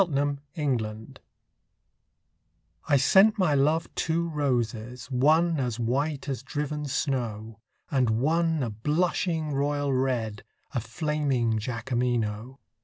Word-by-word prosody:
The 145 0 0 0.2
White 140 -6 +1
Flag 110 0 -7 1.7
I 140 - +5
sent 195 - +5
my 180 -7 +2
love 150 +4 +2
two 170 +1 0
roses, 125 -4 -2
one 155 +5 +3
As 125 -3 -2
white 140 +5 -1
as 135 -4 -3
driven 150 +2 -3
snow, 115 -6 -2 0.3
And 130 -4 +2
one 160 +6 +1
a 115 - -2
blushing 155 - 0
royal 145 0 0
red, 125 -5 -1 0.3
A 125 - +1
flaming 130 -3 0
Jacqueminot. 120 0 -2
135 Hz, 110 wpm, -27 LUFS, 120-150 Hz, 1.7 s, I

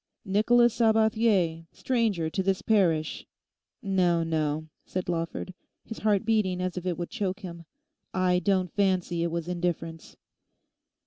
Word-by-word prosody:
'"Nicholas 230 +4 +4
Sabathier, 220 -7 +2
Stranger 225 -10 0
to 175 +4 -2
this 190 0 0
parish"—no, 180 0 0
no,' 155 -1 -1 0.2
said 185 -1 -4
Lawford, 170 +2 -3 0.3
his 225 - -7
heart 210 -2 +1
beating 210 -5 +1
as 180 0 -2
if 180 0 -4
it 175 - -1
would 175 - -5
choke 195 0 -3
him, 170 -3 -8 0.5
'I 185 -1 +2
don't 185 -3 0
fancy 185 -4 +1
it 170 - 0
was 170 0 -3
indifference. 170 -2 -4
185 Hz, 130 wpm, -27 LUFS, 170-205 Hz, 0.5 s, Nicholas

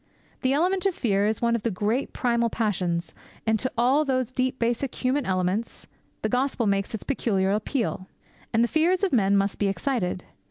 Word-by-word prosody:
The 260 - +2
element 365 +7 +2
of 380 - -1
fear 205 -4 +1
is 220 +2 -1
one 235 0 +3
of 230 - -2
the 230 - 0
great 215 +6 -1
primal 235 -2 +1
passions, 180 -7 -1 0.3
and 220 -1 +2
to 255 - -1
all 260 +6 +4
those 255 -4 0
deep 255 0 -1
basic 240 +2 -1
human 265 +2 0
elements 185 +4 -1 0.4
the - - +2
gospel 250 +1 0
makes 200 +1 0
its 220 - -7
peculiar 195 -8 0
appeal. 215 -2 -1 0.4
And 230 +1 +3
the - - +3
fears 345 +7 +2
of 380 - +1
men 200 -4 +4
must 195 0 0
be 205 - +2
excited. 195 -4 -1
235 Hz, 190 wpm, -25 LUFS, 200-260 Hz, 0.4 s, all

